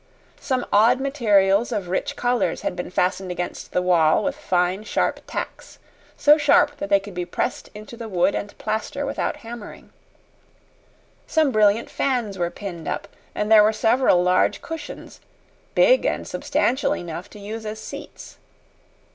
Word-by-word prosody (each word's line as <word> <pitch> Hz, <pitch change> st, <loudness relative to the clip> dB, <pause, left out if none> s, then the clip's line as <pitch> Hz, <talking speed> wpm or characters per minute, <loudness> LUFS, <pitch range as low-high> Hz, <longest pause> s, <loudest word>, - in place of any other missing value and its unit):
Some 255 Hz, -2 st, -1 dB
odd 230 Hz, +5 st, +5 dB
materials 225 Hz, -6 st, +2 dB
of 205 Hz, -5 st, -2 dB
rich 185 Hz, -, -2 dB
colors 245 Hz, 0 st, 0 dB
had -, -, -3 dB
been 180 Hz, -, -5 dB
fastened 185 Hz, +1 st, -1 dB
against 180 Hz, 0 st, -5 dB
the 180 Hz, -, 0 dB
wall 165 Hz, -4 st, +3 dB
with 280 Hz, 0 st, -1 dB
fine, 185 Hz, -7 st, 0 dB
sharp -, -, -1 dB
tacks -, -, -6 dB, 0.4 s
so 300 Hz, +1 st, +5 dB
sharp 290 Hz, 0 st, +4 dB
that 200 Hz, -, -5 dB
they 200 Hz, -1 st, +5 dB
could 200 Hz, 0 st, -10 dB
be 180 Hz, 0 st, -3 dB
pressed 175 Hz, -, -3 dB
into 215 Hz, +2 st, -10 dB
the 230 Hz, -1 st, -7 dB
wood 180 Hz, 0 st, +2 dB
and 205 Hz, -, -5 dB
plaster 220 Hz, +6 st, -3 dB
without 275 Hz, -, -2 dB
hammering. 230 Hz, -2 st, -10 dB, 1.3 s
Some 315 Hz, -4 st, +2 dB
brilliant 215 Hz, 0 st, +2 dB
fans 235 Hz, -8 st, -1 dB
were 175 Hz, -1 st, 0 dB
pinned 175 Hz, -4 st, -8 dB
up, -, -, -4 dB, 0.3 s
and 210 Hz, +1 st, -2 dB
there 220 Hz, -1 st, +9 dB
were 215 Hz, -, +4 dB
several 225 Hz, -4 st, +3 dB
large 180 Hz, 0 st, +2 dB
cushions, 325 Hz, -1 st, -8 dB, 0.5 s
big -, -, +5 dB
and -, -, -1 dB
substantial 260 Hz, +3 st, 0 dB
enough 170 Hz, +1 st, -7 dB
to 210 Hz, -, -13 dB
use 215 Hz, +2 st, -6 dB
as 215 Hz, 0 st, -6 dB
seats. -, -, -10 dB
210 Hz, 155 wpm, -23 LUFS, 185-245 Hz, 1.3 s, there